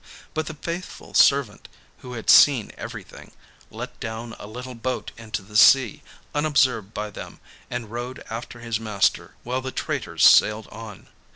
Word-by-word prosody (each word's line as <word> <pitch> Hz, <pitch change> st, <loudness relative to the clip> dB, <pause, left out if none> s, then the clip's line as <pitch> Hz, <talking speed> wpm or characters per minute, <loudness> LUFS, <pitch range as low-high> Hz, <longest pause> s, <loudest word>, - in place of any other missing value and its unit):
But 155 Hz, 0 st, -2 dB
the 160 Hz, -, -6 dB
faithful 170 Hz, +4 st, -7 dB
servant, 140 Hz, -7 st, +3 dB, 0.3 s
who 125 Hz, -, -9 dB
had 115 Hz, -2 st, -7 dB
seen 135 Hz, -7 st, +6 dB
everything, -, -, -10 dB, 0.4 s
let -, -, -8 dB
down 115 Hz, +1 st, -6 dB
a -, -, -9 dB
little 125 Hz, +4 st, -8 dB
boat 125 Hz, +2 st, -4 dB
into 110 Hz, -3 st, -6 dB
the 105 Hz, +2 st, -15 dB
sea, 125 Hz, +2 st, +6 dB, 0.3 s
unobserved 135 Hz, -8 st, +1 dB
by 105 Hz, -1 st, -5 dB
them, -, -, -10 dB, 0.3 s
and 120 Hz, -3 st, -5 dB
rowed 120 Hz, +2 st, -6 dB
after 115 Hz, +1 st, -7 dB
his 115 Hz, -2 st, -2 dB
master 105 Hz, -3 st, 0 dB
while 125 Hz, +2 st, -2 dB
the 130 Hz, 0 st, -5 dB
traitors -, -, -1 dB
sailed 105 Hz, 0 st, +5 dB
on. 110 Hz, -3 st, -10 dB
115 Hz, 155 wpm, -24 LUFS, 110-130 Hz, 0.4 s, seen